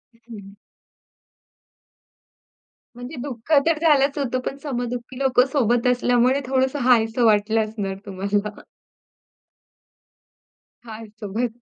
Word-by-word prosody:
हं. 220 -4 -13 2.4
म्हणजे 245 +5 -8
दुःख 260 +1 -8
तर 325 -2 +1
झालंच 280 -1 +3
होतं, 255 -2 -1
पण 275 - -4
सम-दुःखी 245 -2 -5
लोकं 260 -2 +3
सोबत 245 -3 +1
असल्यामुळे 250 +2 +2
थोडंसं 265 +2 0
हायसं 235 -1 +3
वाटलं 220 +1 +3
असणार 205 -3 -5
तुम्हाला. 200 +2 -3 2.3
आहे 225 0 -9
सोबत. 225 +3 -3
240 Hz, 95 wpm, -22 LUFS, 220-260 Hz, 2.4 s, झालंच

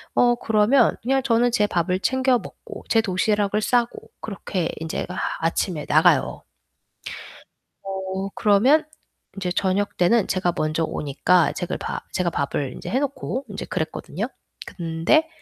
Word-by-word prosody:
어 240 0 +4
그러면 220 +3 +3
그냥 265 +2 +1
저는 240 -1 +3
제 210 -3 +3
밥을 180 +1 0
챙겨 260 +2 +2
먹고, 435 - -10
제 225 - +4
도시락을 205 +1 +1
싸고. 240 +1 0
그렇게 190 -4 -3
인제 160 0 -3 0.3
아침에 165 -1 -1
나가요. - - +3 1.4
어 190 0 -4
그러면 240 +7 +4 0.5
이제 180 -2 -2
저녁 195 +2 0
때는 195 +5 +3
제가 180 -2 0
먼저 155 +1 0
오니까 160 +4 +2
제가 175 - -3
밥 - - -4
제가 180 -2 +1
밥을 140 -3 -2
이제 - - -7
해 260 - +1
놓고 275 -1 -3
인제 200 - -5
그랬거든요. 160 - -3 0.4
근데 170 - +1
200 Hz, 275 characters per minute, -23 LUFS, 175-240 Hz, 1.4 s, 어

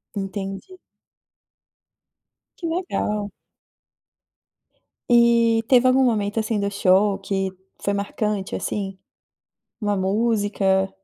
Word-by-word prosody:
Entendi. 195 - -5 1.8
Que 340 - -4
legal. 210 - -2 1.8
E 235 -1 +4
teve 255 -1 +5
algum 260 +1 +4
momento, 215 -3 +1
assim, 215 -1 -1
do 200 - 0
show 200 0 +3
que 195 -1 -2 0.3
foi 200 - 0
marcante, 200 0 -2
assim, 195 -2 -3 0.8
uma 205 -1 0
música? 200 -1 +1
205 Hz, 85 wpm, -22 LUFS, 195-230 Hz, 1.8 s, teve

